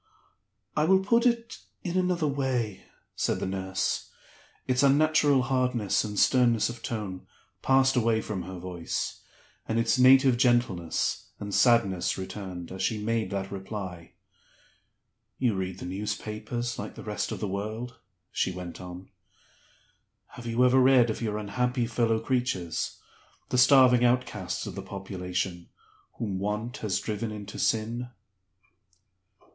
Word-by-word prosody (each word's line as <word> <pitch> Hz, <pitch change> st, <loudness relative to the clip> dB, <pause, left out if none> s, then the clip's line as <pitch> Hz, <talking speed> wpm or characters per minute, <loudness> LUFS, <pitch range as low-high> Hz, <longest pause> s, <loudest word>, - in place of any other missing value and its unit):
"I 150 Hz, -, +2 dB
will 190 Hz, +3 st, +5 dB
put 230 Hz, +4 st, +4 dB
it 235 Hz, -1 st, -1 dB, 0.2 s
in 175 Hz, -1 st, -3 dB
another 180 Hz, -3 st, +1 dB
way," 130 Hz, -7 st, -1 dB, 0.3 s
said -, -, 0 dB
the -, -, -2 dB
nurse. 95 Hz, 0 st, -2 dB, 0.6 s
Its 125 Hz, 0 st, +2 dB
unnatural 145 Hz, -1 st, +4 dB
hardness 125 Hz, -5 st, +1 dB
and 105 Hz, -1 st, -5 dB
sternness 120 Hz, -3 st, +4 dB
of 120 Hz, -1 st, -8 dB
tone 105 Hz, -6 st, -5 dB, 0.3 s
passed 135 Hz, 0 st, +4 dB
away 115 Hz, -2 st, +2 dB
from 105 Hz, -4 st, -4 dB
her 95 Hz, +1 st, -7 dB
voice, 90 Hz, -1 st, -4 dB, 0.5 s
and 110 Hz, -, 0 dB
its 115 Hz, +2 st, +2 dB
native 130 Hz, 0 st, +6 dB
gentleness 120 Hz, -, +1 dB
and 100 Hz, -1 st, -5 dB
sadness 115 Hz, -7 st, +3 dB
returned, 95 Hz, -2 st, -6 dB
as 95 Hz, -, -6 dB
she 110 Hz, -, 0 dB
made 110 Hz, -1 st, -1 dB
that 95 Hz, -1 st, -3 dB
reply. 95 Hz, -3 st, -6 dB, 1.2 s
"You 125 Hz, -4 st, +2 dB
read 95 Hz, -1 st, -3 dB
the -, -, -7 dB
newspapers 105 Hz, +5 st, -4 dB
like -, -, -6 dB
the -, -, -9 dB
rest -, -, -3 dB
of -, -, -4 dB
the 105 Hz, -, -2 dB
world," 110 Hz, +5 st, -5 dB, 0.3 s
she -, -, 0 dB
went 90 Hz, -1 st, -7 dB
on; 90 Hz, +1 st, -9 dB, 1.2 s
"have 120 Hz, -1 st, -10 dB
you 120 Hz, +2 st, +3 dB
ever 130 Hz, +1 st, +5 dB
read 130 Hz, -3 st, +5 dB
of -, -, -6 dB
your 105 Hz, -2 st, -1 dB
unhappy 125 Hz, +4 st, -1 dB
fellow 115 Hz, -1 st, +1 dB
creatures 115 Hz, -8 st, -2 dB, 0.5 s
(the -, -, 0 dB
starving 125 Hz, -2 st, +6 dB
outcasts 125 Hz, +1 st, 0 dB
of -, -, -6 dB
the -, -, -5 dB
population) 90 Hz, -2 st, -4 dB, 0.4 s
whom 100 Hz, -5 st, -3 dB
Want 105 Hz, +5 st, -3 dB
has 105 Hz, -4 st, -1 dB
driven 110 Hz, +1 st, -3 dB
into 105 Hz, -1 st, -7 dB
Sin?" 115 Hz, +2 st, 0 dB
115 Hz, 140 wpm, -28 LUFS, 95-125 Hz, 1.2 s, native